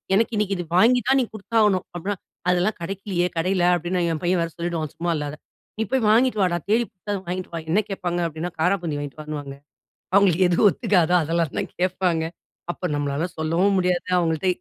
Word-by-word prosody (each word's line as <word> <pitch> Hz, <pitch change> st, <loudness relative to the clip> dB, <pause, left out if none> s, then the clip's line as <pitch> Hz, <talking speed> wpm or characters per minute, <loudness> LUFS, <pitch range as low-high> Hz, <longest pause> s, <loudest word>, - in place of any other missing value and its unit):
எனக்கு 225 Hz, +3 st, +2 dB
இன்னிக்கு 200 Hz, -1 st, 0 dB
இது 175 Hz, -, -4 dB
வாங்கி 245 Hz, +5 st, +5 dB
தான் 270 Hz, +1 st, +4 dB
நீ -, -, 0 dB
குடுத்தாகணும்" 210 Hz, -3 st, +1 dB
அப்பிடின்னா, 195 Hz, +4 st, -3 dB, 0.3 s
"அதெல்லாம் 180 Hz, +4 st, +1 dB
கிடைக்கலயே, 185 Hz, -1 st, -2 dB
கடையில" 180 Hz, +2 st, +1 dB
அப்பிடின்னு 175 Hz, +1 st, -1 dB
என் 155 Hz, -, -4 dB
பையன் 175 Hz, 0 st, +2 dB
வேற 165 Hz, -, -3 dB
சொல்லிவிடுவான், 170 Hz, -3 st, -3 dB
சும்மா 170 Hz, 0 st, 0 dB
இல்லாத. 150 Hz, 0 st, -4 dB, 0.4 s
"நீ -, -, +2 dB
போய் 255 Hz, -4 st, +2 dB
வாங்கிட்டு 230 Hz, 0 st, +3 dB
வாடா. 175 Hz, -1 st, +1 dB
தேடி 225 Hz, +3 st, +4 dB
புடுச்சாவது 200 Hz, 0 st, -5 dB
வாங்கிட்டு 185 Hz, +1 st, -4 dB
வா". 165 Hz, -, -3 dB
என்ன 205 Hz, +5 st, +4 dB
கேட்பாங்க 175 Hz, -3 st, -2 dB
அப்பிடின்னா, 165 Hz, +2 st, -5 dB
காராப்பூந்தி 170 Hz, -4 st, 0 dB
வாங்கிட்டு 145 Hz, +1 st, -7 dB
வான்னுவாங்க. 145 Hz, -2 st, -6 dB, 0.6 s
அவுங்களுக்கு 190 Hz, -2 st, +5 dB
எது 175 Hz, -, +1 dB
ஒத்துக்காதோ, 180 Hz, -6 st, +2 dB
அதெல்லாம் 165 Hz, -1 st, -1 dB
தான் -, -, -3 dB
கேப்பாங்க. 180 Hz, -2 st, +1 dB, 0.5 s
அப்ப 180 Hz, -, -4 dB
நம்மால 145 Hz, +2 st, -1 dB
சொல்லவும் 170 Hz, +5 st, +2 dB
முடியாது. 180 Hz, -1 st, 0 dB
அவங்கள்ட 165 Hz, +1 st, 0 dB
180 Hz, 175 wpm, -23 LUFS, 165-200 Hz, 0.6 s, வாங்கி